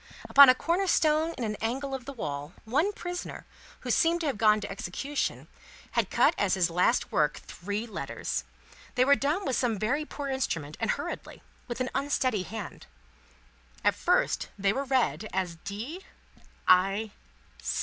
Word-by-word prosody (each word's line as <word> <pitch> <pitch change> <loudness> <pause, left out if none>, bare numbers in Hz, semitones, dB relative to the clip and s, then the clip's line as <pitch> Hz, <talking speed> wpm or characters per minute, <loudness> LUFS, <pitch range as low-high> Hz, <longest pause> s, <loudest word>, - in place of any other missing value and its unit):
Upon 280 -1 +9
a 255 - +7
corner 350 +7 0
stone 315 0 +2
in 245 - -3
an 210 -2 -2
angle 270 +5 -2
of 260 -3 -5
the 275 - -5
wall, 145 - -5
one 295 - +2
prisoner, 355 -3 -6 0.4
who - - -2
seemed 340 +1 +3
to - - -2
have 275 -7 -1
gone 215 -1 +5
to 205 - -6
execution, 235 +10 -3 0.4
had - - +1
cut - - +4
as 190 -2 +2
his 180 -2 +1
last 180 +2 +2
work, 150 -1 +2
three 205 +5 -5
letters. 140 - -4 0.5
They 250 - +4
were 280 - +6
done 295 +7 0
with 265 -3 0
some 235 -4 +1
very 250 +10 0
poor 290 -2 -6
instrument, 165 - -2
and - - -1
hurriedly, - - -4 0.2
with 240 0 -4
an 255 - -1
unsteady 260 -6 0
hand. 205 +1 -7 1.0
At - - +4
first, - - +1
they 195 0 +2
were 275 +3 -2
read 255 -4 +1
as 180 -3 -2
D. 225 - -6 0.6
I. 195 +4 +4
235 Hz, 165 wpm, -28 LUFS, 195-280 Hz, 1.0 s, Upon